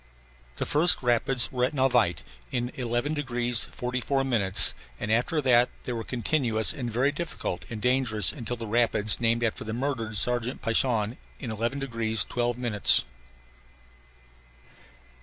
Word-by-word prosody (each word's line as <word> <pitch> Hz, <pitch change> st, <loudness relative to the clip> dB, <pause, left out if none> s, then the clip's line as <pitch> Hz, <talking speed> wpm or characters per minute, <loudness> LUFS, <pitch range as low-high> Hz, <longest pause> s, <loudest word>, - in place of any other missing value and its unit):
The -, -, -3 dB
first 155 Hz, -1 st, +4 dB
rapids 125 Hz, +1 st, +2 dB
were 125 Hz, -1 st, -2 dB
at 130 Hz, +4 st, -1 dB
Navaite 125 Hz, -, +1 dB, 0.3 s
in 125 Hz, 0 st, -2 dB
11 120 Hz, +4 st, -2 dB
degrees 125 Hz, -5 st, 0 dB
44 125 Hz, +2 st, -3 dB
minutes 105 Hz, -8 st, +5 dB, 0.3 s
and 105 Hz, -, -3 dB
after 150 Hz, +8 st, 0 dB
that 125 Hz, -1 st, +4 dB
they 125 Hz, -, -4 dB
were 115 Hz, -1 st, -4 dB
continuous 120 Hz, -2 st, 0 dB
and 120 Hz, -3 st, -5 dB
very 125 Hz, +5 st, +1 dB
difficult 145 Hz, -, -5 dB
and 110 Hz, -, -6 dB
dangerous 125 Hz, -4 st, +3 dB
until 120 Hz, +1 st, -5 dB
the 115 Hz, -1 st, -7 dB
rapids 110 Hz, -2 st, +2 dB
named 115 Hz, 0 st, +1 dB
after 120 Hz, +2 st, -2 dB
the 110 Hz, -2 st, -6 dB
murdered 115 Hz, -4 st, -3 dB
sergeant 120 Hz, +3 st, -1 dB
Paishon 115 Hz, 0 st, +1 dB, 0.2 s
in 120 Hz, -, -6 dB
11 115 Hz, +5 st, -3 dB
degrees 115 Hz, -5 st, -1 dB
12 120 Hz, 0 st, -2 dB
minutes. 115 Hz, -5 st, +1 dB
120 Hz, 140 wpm, -26 LUFS, 115-130 Hz, 0.3 s, minutes